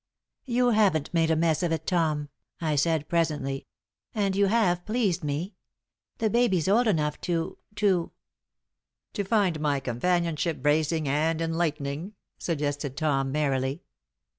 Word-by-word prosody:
"You 245 0 +2
haven't 190 -9 +2
made 165 -1 +2
a 160 - +3
mess 160 0 +2
of 175 -2 0
it, 165 - -2
Tom," 155 -5 0 0.3
I 155 -3 0
said, 155 +1 +1
presently, 145 -5 -1 0.5
"and 200 -3 +1
you 200 0 +3
have 190 -5 +2
pleased 210 -6 0
me. 150 +7 -3 0.6
The 225 - +1
baby's 210 -7 +2
old 225 +5 +4
enough 150 -7 0
to 170 -2 -2 0.2
to 195 -5 +1 0.5
" - - -60
"To 205 - -1
find 195 -6 +1
my 145 -2 +1
companionship 165 +5 0
bracing 155 +1 +2
and 155 +4 +1
enlightening?" 165 +1 -2 0.2
suggested 145 -4 -2
Tom, 135 -3 +1
merrily. 135 -2 -1
165 Hz, 140 wpm, -27 LUFS, 145-185 Hz, 0.6 s, old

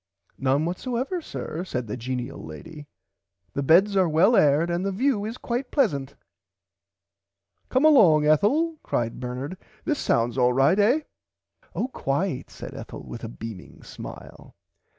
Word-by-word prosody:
None 135 +3 +2
whatever 250 - -2
sir 175 - -5
said 125 -9 -3
the 105 - -4
genial 125 0 -5
lady 150 - -10 0.7
the 140 - -1
beds 180 +8 +5
are 185 -3 +3
well 180 +10 +4
aired 150 +2 +4
and 175 +2 -1
the 195 - -1
view 215 0 +1
is 225 +3 -5
quite 245 +2 -3
pleasant. 145 - 0 1.5
Come 260 +4 +2
along 180 - +6
Ethel 290 - +2
cried 115 -1 -2
Bernard 130 +8 -5 0.3
this 300 -3 0
sounds 120 +2 +1
alright 135 +9 +4
eh. 245 +10 +4 0.7
Oh 245 - 0
quite 145 - -2
said - - -9
Ethel - - -8
with - - -9
a - - -4
beaming 95 - -9
smile. - - -11
165 Hz, 140 wpm, -25 LUFS, -, 1.5 s, along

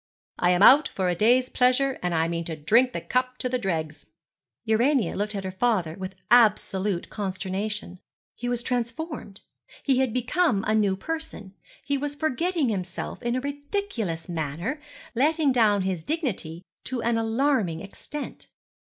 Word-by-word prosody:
'I 180 - +3
am 180 +2 +4
out 285 +7 +8
for 185 -2 -1
a 175 - 0
day's 245 +7 +4
pleasure, 255 +2 +2
and 180 -1 -1
I 160 0 +2
mean 170 0 -2
to 160 - -4
drink 225 +12 +3
the - - -4
cup 255 0 -1
to 255 - -2
the 250 0 -1
dregs.' 160 -7 -3 0.6
Urania 235 - +2
looked 210 +1 -2
at 195 - -3
her 190 - -4
father 190 -5 +1
with 185 +2 -7 0.2
absolute 205 -5 +3
consternation. 195 -1 -3 0.3
He 245 - -4
was 240 -1 -1
transformed; 245 - -4 0.4
he 265 -2 +2
had 260 -3 +2
become 250 - +1
a 215 - +2
new 205 -3 +2
person; 315 -9 -6 0.3
he 280 -1 0
was 290 +1 -3
forgetting 315 0 0
himself 185 -4 -4
in 240 0 -1
a 255 - -1
ridiculous 285 - -3
manner; 170 - -3 0.3
letting 295 +3 +2
down 215 -5 +3
his 185 -4 -2
dignity 190 - -3 0.2
to 250 -3 -3
an 230 0 +1
alarming 225 - +1
extent. 290 +9 -7
225 Hz, 160 wpm, -26 LUFS, 185-260 Hz, 0.6 s, out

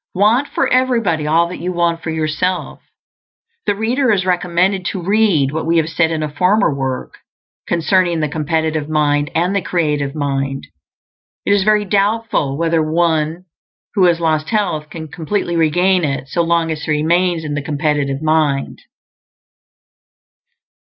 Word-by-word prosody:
Want 220 +9 +3
for 270 - 0
everybody 230 -13 +1
all 165 +2 +3
that 180 - -7
you 180 +2 -3
want 170 -1 0
for 165 - -5
yourself. 160 +3 -2 0.9
The 205 - +2
reader 240 +4 +1
is 190 -3 +1
recommended 180 +1 +1
to 190 - -2
read 195 -8 +2
what 160 +2 -3
we 165 0 +2
have 160 -1 +1
said 165 0 +1
in 160 -1 -2
a 150 - -4
former 180 +2 +2
work[A] 135 -2 -3 0.6
concerning 175 0 +1
the 155 - 0
Competitive 155 0 -2
mind 150 -1 +1
and 180 +4 +1
the 200 - +1
Creative 150 -6 -1
mind. 135 -2 -2 0.8
It 200 - +3
is 200 -1 +2
very 210 0 +3
doubtful 200 -8 0
whether 165 0 +1
one 160 +1 0 0.5
who 195 -3 +3
has 170 -1 +3
lost 155 -2 0
health 175 -9 -1
can 160 -1 -7
completely 170 +3 -3
regain 175 +3 +2
it 135 -2 -2
so 170 - 0
long 165 -1 +1
as 155 -1 -4
he - - -6
remains 170 +3 +1
in 150 -1 -4
the 145 - -2
competitive 145 -1 -1
mind. 155 -3 0
165 Hz, 155 wpm, -17 LUFS, 150-185 Hz, 0.9 s, Want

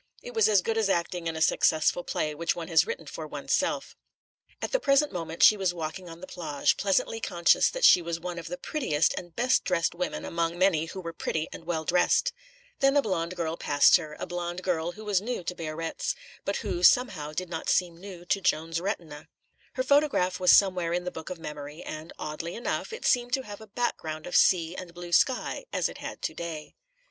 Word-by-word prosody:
It - - -8
was 445 - +4
as 200 -4 +4
good 225 0 0
as 215 -3 +1
acting 170 -1 -1
in 165 - -2
a 160 - +1
successful 160 +2 +2
play 155 -2 -2
which 170 +3 -1
one 170 -1 -6
has 165 - +4
written 470 +2 -5
for - - -7
oneself. - - -1 0.6
At - - -4
the - - +2
present 285 - +3
moment 165 -2 -3
she 215 - +9
was 190 -3 -1
walking 170 +2 -5
on 165 +1 -11
the - - -6
plage, 155 -6 0
pleasantly 200 +3 0
conscious 175 -6 +3
that - - +1
she 180 - +8
was 170 0 -3
one 175 0 -5
of 165 - -8
the 180 +2 -5
prettiest 170 - 0
and 175 -2 -8
best 250 +2 +2
dressed 175 -3 0
women 180 +1 -3
among 170 0 -1
many 175 -4 +3
who 190 +3 -7
were 165 -1 -6
pretty 160 -1 -2
and 165 - -10
well 160 -2 -2
dressed. 180 +2 +2 0.5
Then 275 +1 +4
a - - +6
blonde 180 -3 -2
girl 165 -1 -2
passed 145 +4 +5
her, 155 -3 -8
a - - -3
blonde 175 +1 -4
girl 175 -1 -1
who 215 0 -11
was 200 -3 +2
new 235 -3 -3
to 180 - -3
Biarritz, 165 - -3 0.3
but - - -1
who, 350 - -2
somehow, 245 - +4
did 180 +3 -4
not 165 - -3
seem 175 -2 +2
new 180 -1 -10
to 195 +2 0
Joan's 165 -1 0
retina. 160 -6 -5 0.5
Her 255 - -1
photograph 275 -10 +2
was 180 -1 +5
somewhere 185 -4 +4
in 180 0 -1
the 180 - -4
book 160 - -8
of 185 - -5
memory, 150 0 -8
and, 155 +2 -7
oddly 165 +3 -5
enough, 235 - -3
it 455 - -7
seemed 245 0 +2
to 265 - +1
have 205 -2 -9
a 220 - -11
background 160 -9 -3
of 180 - -5
sea 170 -2 +4
and 175 -2 -9
blue 175 0 -8
sky, 255 - +2
as - - +1
it - - -10
had - - -7
to - - -2
day. 165 -3 -6
175 Hz, 220 wpm, -27 LUFS, 165-200 Hz, 0.6 s, she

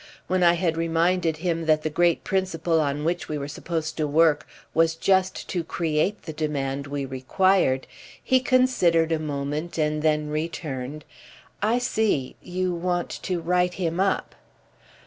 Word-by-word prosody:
When 185 0 0
I 170 -1 +6
had 170 -2 0
reminded 165 0 +1
him 165 -1 -2
that 155 -1 +3
the 155 - 0
great 170 +1 +2
principle 170 -4 0
on 145 0 -1
which 175 +2 -1
we 155 - -2
were 140 -1 -4
supposed 160 +1 -4
to 155 -2 0
work 155 0 +3 0.3
was 165 0 +3
just 190 +2 +1
to 175 -2 -1
create 165 +4 -1
the 160 - -6
demand 140 -2 -2
we 140 -1 -3
required, 135 +2 +2 0.4
he 260 - +4
considered 250 -11 +3
a 160 - +1
moment 150 +2 -3
and 150 -1 0
then 150 -1 +1
returned: 150 -3 -4 0.6
"I 220 +4 +2
see—you 185 - -1
want 175 0 -1
to 180 -2 -2
write 180 +1 +1
him 170 -2 -2
up." 195 0 0
165 Hz, 150 wpm, -25 LUFS, 150-180 Hz, 0.6 s, I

